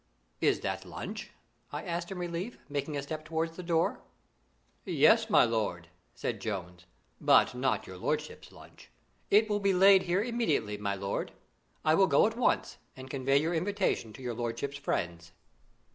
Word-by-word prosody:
"Is - - +2
that - - -3
lunch?" 215 +2 -7 0.4
I 145 +2 -5
asked 175 0 -4
in 190 - -5
relief, 175 +5 -4
making 145 +1 -3
a 140 - -3
step 155 +2 -5
towards 165 +1 -2
the 180 - -6
door. 170 -2 0 0.8
"Yes, - - +4
my - - +6
lord," 105 -7 -2 0.3
said - - -3
Jones; 90 -4 -5 0.3
"but - - +5
not 125 +1 0
your 95 - -9
lordship's - - -3
lunch. - - -16 0.4
It 215 +2 +5
will 205 -1 0
be 200 -2 +2
laid 195 +1 +7
here 185 +3 0
immediately, 230 - 0
my 100 -1 -2
lord. 100 0 -3 0.5
I 155 - +5
will 190 +4 +5
go - - +5
at 225 +1 -1
once 245 - 0 0.2
and 130 0 -9
convey 135 0 +2
your 160 +4 -1
invitation 180 - 0
to 130 - -11
your 120 -1 -3
lordship's 120 +4 -3
friends." 85 -10 -3
155 Hz, 165 wpm, -30 LUFS, 115-185 Hz, 0.8 s, laid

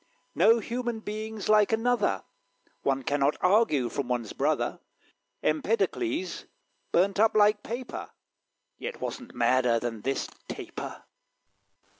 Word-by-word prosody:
No 220 +7 +5
human 235 0 -3
being's 215 0 -5
like 215 0 +5
another: 225 - +1 0.6
One 135 -1 0
cannot 145 +2 +1
argue 180 - +3
from 135 +1 -3
one's 120 -3 -2
brother. - - 0 0.6
Empedocles 230 - 0 0.5
burnt 195 +3 +2
up 220 0 +4
like 210 0 +5
paper; 240 +4 -6 0.7
Yet 485 - -5
wasn't 250 -2 -6
madder 120 0 +3
than 115 -2 -4
this 135 +4 -1 0.2
Taper. - - -7
205 Hz, 110 wpm, -28 LUFS, 135-225 Hz, 0.7 s, No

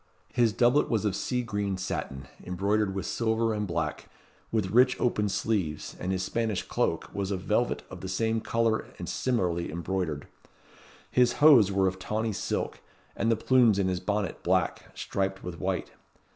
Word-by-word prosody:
His 120 -2 +3
doublet 120 +6 +3
was 110 -2 0
of 100 -3 +1
sea 125 +5 -1
green 100 -4 -2
satin, 65 -8 -4 0.2
embroidered 100 +2 0
with 95 -2 -3
silver 115 -1 0
and 105 -1 -2
black, 85 -3 -3 0.4
with 105 -5 0
rich 125 +3 +4
open 105 -4 +1
sleeves, 95 -6 -2
and 90 - -2
his 95 -1 -1
Spanish 110 -1 -1
cloak - - -1
was 100 -1 -2
of 95 -2 -2
velvet - - 0
of - - -8
the 95 - -5
same 110 +4 0
colour 115 -1 0
and - - -6
similarly 90 -11 -1
embroidered. 85 -3 -3 0.8
His 125 -1 +4
hose 135 -10 +7
were 95 0 +2
of 95 0 -2
tawny 110 +3 -2
silk, - - -3 0.4
and 115 - +1
the - - +4
plumes 115 -2 +4
in 95 -2 +1
his 90 -1 -1
bonnet 105 -2 -2
black, - - 0
striped 95 0 -2
with 85 -2 -6
white. - - -2
100 Hz, 170 wpm, -28 LUFS, 95-115 Hz, 0.8 s, hose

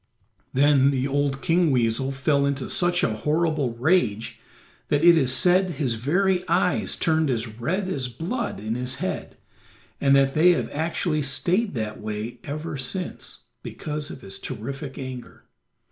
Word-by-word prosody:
Then 140 0 +4
the 135 -1 0
old 140 0 -1
King 175 -1 +3
Weasel 125 +1 +1
fell 140 +1 +1
into 140 -2 -2
such 175 0 +2
a 110 -1 0
horrible 150 -1 0
rage 120 - +1 0.5
that 145 +1 +1
it 170 0 +8
is 135 -5 +2
said 185 +5 +4
his 140 -7 -1
very 180 - +1
eyes 180 +1 +1
turned 160 -2 +1
as 115 -2 0
red 185 +10 -1
as 135 -9 -2
blood 175 - -4
in 110 +2 -3
his 125 +2 -2
head, 95 - -4 0.6
and 140 0 +5
that 135 0 +3
they 175 +3 +5
have - - -3
actually 160 0 -1
stayed 180 - +1
that 110 -2 -4
way 110 +3 -5
ever 150 +1 -5
since, 175 +8 -5 0.2
because 150 -1 -5
of - - -9
his 95 -4 -7
terrific 135 +4 -6
anger. 130 -2 -8
140 Hz, 155 wpm, -24 LUFS, 125-170 Hz, 0.6 s, it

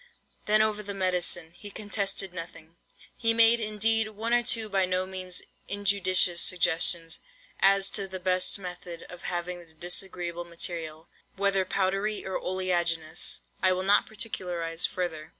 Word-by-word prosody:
Then 215 +1 +5
over 215 -1 -1
the 200 -1 -6
medicine, 180 -3 0
he 205 +4 -10
contested 200 -2 -2
nothing. 165 -2 -9 0.4
He 225 -1 +3
made, 230 +1 +7
indeed, 220 +1 +3
one 220 +2 -3
or 240 - +5
two 230 -2 +2
by 195 -2 +1
no 185 0 0
means 185 -1 -5 0.2
injudicious 190 -3 +2
suggestions, 165 -1 +3 0.4
as 195 0 +4
to 200 -2 -1
the 190 0 -7
best 185 +1 +1
method 180 -2 -8
of 180 - -11
having 175 0 -4
the 165 -2 -17
disagreeable 175 0 -4
material, 165 -2 -3 0.3
whether 195 -1 +1
powdery 195 +3 -1
or 190 - -3
oleaginous, 175 -4 0 0.2
(I 185 -1 +4
will 185 +1 -2
not 200 +2 +3
particularize 180 -6 -1
further!) 160 -4 -4
185 Hz, 145 wpm, -27 LUFS, 175-200 Hz, 0.4 s, made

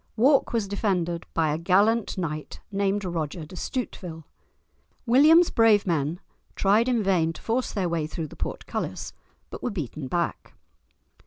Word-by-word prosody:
Wark 265 +5 +4
was 225 -4 0
defended 180 -4 -1
by 160 -2 +2
a 155 - -2
gallant 200 +7 +2
knight 155 -4 -4
named 200 0 0
Roger 165 -2 -3
de 170 - -12
Stuteville. 180 -6 -5 0.8
William's 305 +8 +6
brave 220 -3 +4
men 165 -1 -1 0.4
tried 210 +5 +3
in 235 -4 +1
vain 170 -4 +2
to - - -12
force 245 +3 -1
their 195 -5 -1
way 165 -3 -1
through 160 +1 -5
the - - -12
portcullis, - - -4 0.4
but - - -7
were - - -1
beaten 155 - -5
back. 170 +5 -2
190 Hz, 150 wpm, -26 LUFS, 165-225 Hz, 0.8 s, William's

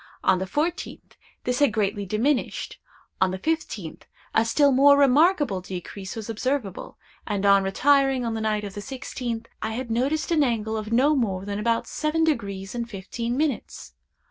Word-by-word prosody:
On 185 - +3
the 190 - -3
fourteenth 315 - -3 0.3
this 250 0 -1
had 285 -5 +4
greatly 205 -1 -1
diminished; 245 +8 -1 0.4
on 190 - +4
the 185 - -3
fifteenth 220 - -3 0.3
a 225 - +4
still 280 +5 +3
more 280 +2 +6
remarkable 285 - +4
decrease 190 +1 -7
was 220 -2 -6
observable; 225 -2 -3 0.3
and, 205 -2 -1
on 200 0 +6
retiring 270 +5 +3
on 230 - -1
the 220 - -3
night 215 -1 0
of 200 -1 -6
the 205 - -6
sixteenth, 245 -2 -5
I 220 0 -2
had 240 0 -4
noticed 275 +9 0
an 320 -2 +3
angle 220 -4 -1
of 215 0 -4
no 275 +6 +4
more 195 -7 -1
than 200 0 -3
about 230 +1 +1
seven 315 +1 -1
degrees 200 -11 -1
and 235 -1 -4
fifteen 230 +4 -4
minutes. 300 -1 -3
230 Hz, 170 wpm, -25 LUFS, 205-275 Hz, 0.4 s, more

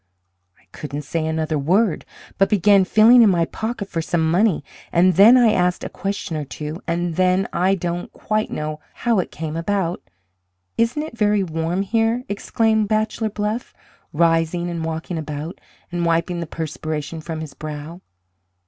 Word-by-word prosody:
I - - -28
couldn't 150 0 -6
say 160 +2 -2
another 160 -1 -1
word, 180 +6 +1 0.3
but 195 - +4
began 200 -1 +4
feeling 225 +5 +6
in 220 - +7
my 170 -3 +2
pocket 220 +2 -4
for 165 -4 -3
some 160 -1 0
money, 185 -3 +2 0.3
and 180 +2 +4
then 215 +8 +8
I 240 -3 +5
asked 180 -3 +1
a - - -4
question 195 -4 -4
or 155 - -2
two, 150 +3 -6
and 170 -1 -1
then 185 +1 +2
I 190 +2 +2
don't 175 -1 -4
quite 215 0 -2
know 155 0 -4 0.2
how 235 -4 +1
it 180 - -2
came 160 0 -5
about 175 0 -1 0.7
isn't 235 +6 +1
it 310 - -8
very 210 -2 +2
warm 165 +2 -2
here?" 225 +4 +1
exclaimed 220 +1 +1
Bachelor 215 +1 0
Bluff, 210 +3 -3 0.4
rising 165 +2 +1
and 170 -1 -4
walking 160 +1 -4
about, 155 +3 -6 0.3
and 175 0 -2
wiping 170 +1 0
the 170 - -4
perspiration 155 0 -5
from 160 0 -5
his 155 -3 -7
brow. 155 +3 -7
175 Hz, 165 wpm, -21 LUFS, 160-210 Hz, 0.7 s, then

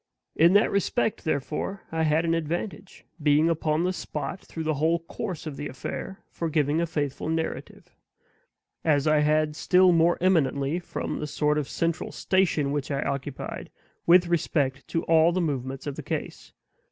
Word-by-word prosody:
In 170 +3 +5
that 205 +2 +4
respect, 205 +2 0
therefore, 155 +6 -2
I 165 0 -1
had 160 +1 +2
an 165 - +1
advantage, 170 +4 -4 0.2
being 150 +2 +4
upon 155 0 0
the 185 +1 0
spot 165 0 -5
through 165 - -7
the 155 0 0
whole 160 +4 +2
course 170 +1 -6
of 150 -3 -6
the 145 - -4
affair, 170 +8 -6
for 165 - -3
giving 150 0 +1
a 170 - 0
faithful 145 -2 -3
narrative; 160 0 -4 0.9
as 145 -3 +2
I 155 -1 +4
had 150 0 +2
still 185 +2 +4
more 170 0 +3
eminently, 160 -4 +2
from 175 - -4
the 150 - -3
sort 150 +1 +1
of 145 - -4
central 165 0 -2
station 165 -7 +1
which 145 -1 -2
I 140 -1 -1
occupied, 140 0 -4 0.4
with 175 +1 +7
respect 145 -6 0
to 165 - -1
all 165 +1 +4
the 185 - 0
movements 135 -5 -3
of 145 -2 -4
the - - -4
case. - - -5
160 Hz, 170 wpm, -26 LUFS, 145-170 Hz, 0.9 s, with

